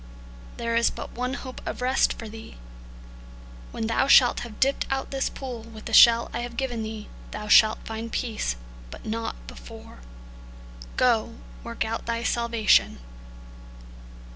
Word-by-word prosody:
There 230 0 -2
is 235 0 +4
but - - -8
one 250 +2 -3
hope 255 -2 -8
of - - -5
rest 255 +1 +2
for 225 - -9
thee. 220 - -11 1.1
When 225 - -4
thou 230 +4 +1
shalt 255 -3 +6
have 230 -3 -9
dipped 275 +1 +1
out 270 0 -2
this 270 -1 -1
pool 255 -4 -7
with 220 -1 -12
the 225 - -6
shell 235 +1 +7
I - - -2
have 240 -1 -6
given 245 -3 -2
thee, 220 -1 -6 0.2
thou 210 0 -7
shalt 215 +1 +5
find 225 +1 -6
peace, 220 - -2 0.3
but - - -11
not 225 +1 -3
before. - - -12 1.0
Go, 230 -2 +2 0.3
work 235 -1 -3
out 225 +1 -4
thy 230 0 -2
salvation." 235 -2 +2
230 Hz, 150 wpm, -25 LUFS, 220-245 Hz, 1.1 s, shell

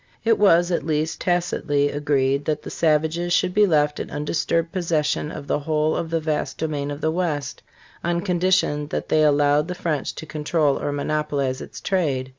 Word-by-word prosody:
It 225 -1 +3
was, 175 -3 +4
at 170 - 0
least 155 +1 -1
tacitly, 160 -5 0
agreed 140 -1 0
that 150 -1 -1
the - - -7
savages 160 +2 +1
should 180 - +2
be 210 +1 +4
left 150 -3 +2
in - - -5
undisturbed 165 +3 -1
possession 160 -5 -1
of 145 - -7
the 145 - 0
whole 155 +1 0
of 165 - -3
the 165 0 0
vast 155 -1 -2
domain 150 -3 -2
of 145 +1 -6
the 160 - +1
West 160 -6 -2 0.4
on 170 0 0
condition 180 -5 +1
that - - -4
they 155 - +3
allowed 145 0 +3
the 180 - -4
French 165 -5 -2
to - - -7
control 150 -1 0
or - - -1
monopolize 140 -2 -1
its - - -9
trade. 140 -9 -1
155 Hz, 185 wpm, -23 LUFS, 145-170 Hz, 0.4 s, was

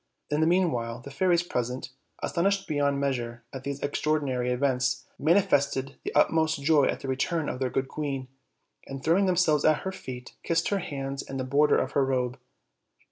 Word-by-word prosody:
In 150 +1 +1
the 160 - +4
meanwhile, 125 -11 +1
the 140 +3 -10
fairies 175 +3 +2
present, 125 -5 -3 0.3
astonished 195 +3 +1
beyond 145 -2 +1
measure 120 -4 -2
at 135 -1 -6
these 140 0 -4
extraordi 150 +1 0
nary 125 -2 -1
events, 130 0 0
manifested 145 -5 +2
the - - -3
utmost 160 -2 +3
joy 150 -2 +5
at - - -1
the - - -6
return 145 +4 0
of - - -3
their 130 -1 0
good 135 +1 -1
queen, 140 -3 -4 0.6
and, 135 -1 -7
throwing 185 +5 +3
themselves 170 -5 +3
at 155 -1 +4
her 190 - -3
feet, 125 -8 -8
kissed 165 0 0
her 200 - +1
hands 135 -5 -4
and 135 - -6
the - - -1
border 140 +3 +3
of 130 - -1
her 140 - +2
robe. 130 -1 -1
140 Hz, 185 wpm, -27 LUFS, 130-160 Hz, 0.6 s, joy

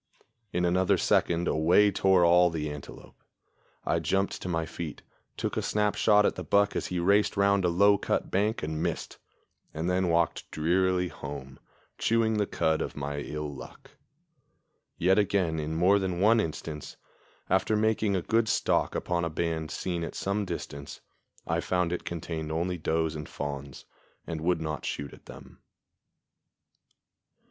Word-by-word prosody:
In 90 0 0
another 90 +1 +3
second 85 +1 +2
away 90 +6 +4
tore 95 -3 +4
all 90 +1 +6
the 75 -2 -3
antelope. 75 -2 -11 0.6
I - - +1
jumped 95 0 -1
to 90 - -4
my 80 -2 -1
feet, 80 -1 -7 0.3
took - - -2
a - - +1
snap 105 -1 +1
shot 105 -1 +4
at - - +2
the - - -6
buck 100 0 +2
as - - -1
he 90 - -3
raced 100 +4 +2
round 100 -1 +3
a 90 - +3
low 100 +3 +4
cut - - -1
bank 105 +4 0
and 80 0 -3
missed, 85 -1 -3 0.6
and 80 +2 -2
then 90 0 +1
walked 85 0 0
drearily 90 +3 +1
home, 70 -3 -8 0.4
chewing 115 -1 +2
the 105 - +1
cud 80 0 0
of - - -4
my 70 0 -4
ill 75 0 -5
luck. - - -12 1.1
Yet 95 +4 +3
again 95 -6 +1
in 75 +1 -3
more 95 +5 +4
than 90 -2 -2
one 110 +4 +5
instance, 80 -4 -5 0.5
after 95 +3 +2
making 110 -1 +1
a 90 - -1
good 115 +2 +1
stalk - - +1
upon 85 -1 -1
a 85 - 0
band 80 -1 -2
seen 85 +2 -3
at - - -6
some 100 +1 -1
distance, 70 -5 -6 0.5
I - - 0
found 90 -2 0
it 90 - -4
contained 80 -2 -4
only 85 +2 -1
does 80 0 0
and 75 -1 -7
fawns, 70 -1 -6 0.4
and 80 -2 -5
would 85 0 +1
not 75 -3 -4
shoot 70 -2 -4
at - - -16
them. 65 +1 -13
85 Hz, 165 wpm, -28 LUFS, 80-95 Hz, 1.1 s, all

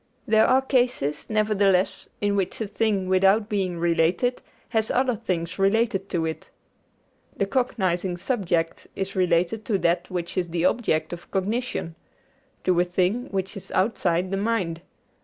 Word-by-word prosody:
There 220 0 +5
are 260 +1 +4
cases, 245 - 0
nevertheless, 205 -3 +2
in 205 -1 +1
which 195 -3 -1
a 220 - -1
thing, 205 -2 0
without 195 +3 +4
being 190 -4 -1
related, 170 +8 +1 0.3
has 220 -2 +1
other 255 0 +2
things 170 -3 -3
related 195 -1 +1
to 165 -3 0
it. 160 0 -5 0.9
The 200 - +1
cognizing 190 -7 0
subject 175 -7 -1
is 195 +1 -4
related 180 +3 +1
to 215 -5 +1
that 175 -1 0
which 175 -2 -4
is 175 -2 0
the 170 +1 0
object 160 -7 +1
of 175 0 -9
cognition 205 -2 -2 0.7
to 180 -2 +2
a - - +5
thing 185 +7 0
which 190 -1 -3
is 195 - -8
outside 185 -3 +1
the 195 - 0
mind. 195 -6 -1
195 Hz, 150 wpm, -25 LUFS, 175-220 Hz, 0.9 s, There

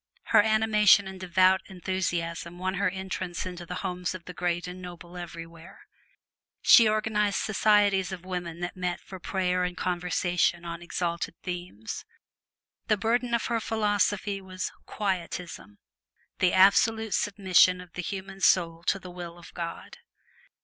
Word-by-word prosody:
Her - - +9
animation 215 -2 +4
and 190 -1 -8
devout 185 +1 +3
enthusiasm 175 -2 -3
won 185 +1 -2
her 195 0 +1
entrance 190 -2 -4
into 175 -2 -7
the 180 - -5
homes 180 0 -2
of 175 - -10
the 180 - -8
great 175 0 -1
and 180 +1 -8
noble 175 0 -10
everywhere. 165 -1 -9 0.8
She 230 -2 +8
organized 215 -2 +1
societies 205 -3 +3
of 185 -1 -7
women 175 -2 -5
that 175 0 -4
met 180 -1 -2
for 190 - -10
prayer 180 0 0
and 180 0 -3
conversation 175 -1 0
on 170 0 -6
exalted 170 -1 -3
themes. 175 - -6 0.8
The 215 - +3
burden 235 +3 +1
of 235 - -1
her 235 -1 0
philosophy 205 -2 0
was 185 -1 -5 0.2
"Quietism" 180 - -4 0.6
the 180 -1 +4
absolute 220 +3 +4
submission 185 -2 +3
of 180 -2 -12
the 180 - -4
human 195 +1 -6
soul 165 -3 +3
to - - +3
the 185 -2 -10
will 175 -1 -8
of 170 - -14
God. 170 -1 -6
185 Hz, 145 wpm, -27 LUFS, 175-200 Hz, 0.8 s, Her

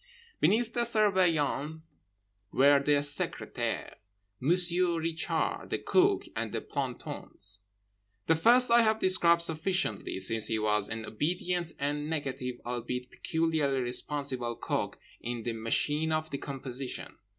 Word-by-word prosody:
Beneath 220 +8 +2
the - - -2
Surveillant 175 -9 +1 0.7
were 140 +1 +5
the 145 +1 +2
Secrétaire, 145 0 -2 0.4
Monsieur 175 +3 +5
Richard, 165 0 -2
the - - 0
Cook, 385 +1 +2
and - - -3
the - - -2
plantons. 120 -7 -5 0.7
The 165 - +3
first 240 +8 +5
I 235 0 +7
have 220 -1 +2
described 170 -4 +4
sufficiently, 160 - -1
since 110 +3 +2
he 110 - 0
was 105 -1 0
an 115 0 -5
obedient 175 +7 -2
and 145 +2 -2
negative—albeit 125 -4 -4
peculiarly 160 -5 0
responsible—cog 125 -1 -2 0.2
in 120 -1 -5
the 120 - -2
machine 145 +8 0
of 155 0 -1
decomposition. 135 -2 -5
150 Hz, 115 wpm, -29 LUFS, 125-175 Hz, 0.7 s, I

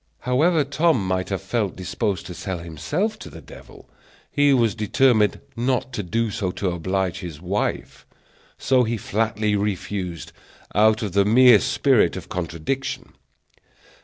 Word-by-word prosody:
However 150 +6 +2
Tom 140 - +1
might 95 0 -1
have 95 -1 -3
felt 100 0 -1
disposed 95 +1 -3
to 90 - -7
sell 95 +2 -5
himself 85 - -3
to - - -9
the - - -11
devil, - - -14 0.4
he 145 -1 +3
was 115 -6 +3
determined 110 0 +2 0.2
not 125 +1 -1
to - - -2
do 110 +4 -1
so 100 -3 -2
to 95 -3 -2
oblige 95 +1 -2
his 85 -4 -8
wife; 95 +5 -3 0.5
so 130 -1 +2
he 115 0 -1
flatly 105 0 -1
refused, 95 -3 -3 0.4
out 110 +2 +3
of 105 - -3
the 100 +2 +3
mere 120 +2 +6
spirit - - +2
of - - -8
contradiction. 90 - -4
105 Hz, 145 wpm, -23 LUFS, 95-125 Hz, 0.5 s, mere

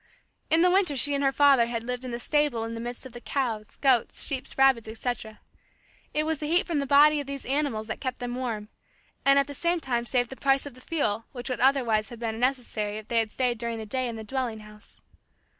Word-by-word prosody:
In 325 +2 +4
the 360 - +5
winter 360 -7 +2
she 285 +3 +2
and 280 0 0
her 270 - +3
father 275 -4 +5
had 230 -1 -3
lived 250 +1 -4
in 255 - -5
the 235 0 -4
stable 295 -4 +1
in 225 0 -4
the 230 - -5
midst 240 +2 -5
of 260 - -10
the 240 - -9
cows, 230 -7 -3
goats, 260 -5 +2
sheep, 270 -2 -2
rabbits, 270 -4 +4
etc. 220 -1 -5 0.7
It 305 - +1
was 315 -1 -1
the 300 - -3
heat 345 +3 +3
from 330 -4 -1
the 280 - -2
bodies 295 +2 +6
of 280 - -9
these 280 -1 -6
animals 270 -5 -1
that 220 - -6
kept 255 -2 -3
them 245 -1 -4
quite 250 - -4
warm; 215 -4 -4 0.6
and 275 0 +6
at 280 - +4
the 285 - -8
same 340 +4 0
time 240 -5 -1
saved 245 0 0
the - - -6
price 270 +1 +2
of 285 - -8
the 255 - -16
fuel 230 -9 -1
which 245 0 -5
would 255 - -2
otherwise 245 -5 +2
have 240 - -9
been 225 -1 -3
necessary 235 -5 -1
if 215 0 -10
they 235 - +3
had 220 -1 -1
stayed 245 -2 0
during 235 -1 -2
the 220 - -6
day 255 +3 0
in 235 - -4
the 220 - -7
dwelling 240 -2 -3
house. 210 0 -15
250 Hz, 250 wpm, -27 LUFS, 230-280 Hz, 0.7 s, bodies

